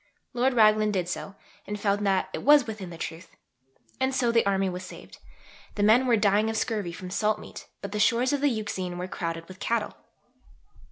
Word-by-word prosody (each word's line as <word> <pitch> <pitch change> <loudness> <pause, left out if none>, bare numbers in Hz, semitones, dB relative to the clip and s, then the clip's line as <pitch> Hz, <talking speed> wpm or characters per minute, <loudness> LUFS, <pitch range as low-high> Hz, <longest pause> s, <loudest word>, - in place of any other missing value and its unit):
Lord 250 +1 +1
Raglan 215 -1 +5
did 185 -4 -1
so, 195 +2 -5 0.3
and 210 0 -4
found 205 0 0
that 190 -1 +1
it - - -4
was 290 -2 +6
within 210 -5 -6
the 170 - -9
truth. 165 0 -7 0.6
And 260 0 0
so 245 -2 +2
the 230 0 +3
Army 195 -1 +1
was 180 0 -4
saved. 180 - -12 0.6
The 205 - 0
men 235 +5 +5
were 235 -2 +4
dying 210 +1 +2
of 225 - -2
scurvy 215 -6 -2
from 180 +1 -8
salt 215 +2 +1
meat; - - -11 0.2
but 200 - -5
the 210 - -3
shores 240 +5 +3
of 285 - 0
the 290 - +4
Euxine 205 -6 -3
were 180 +1 -4
crowded 165 -3 -5
with 185 0 -12
cattle. 230 -3 -1
210 Hz, 205 wpm, -27 LUFS, 185-230 Hz, 0.6 s, was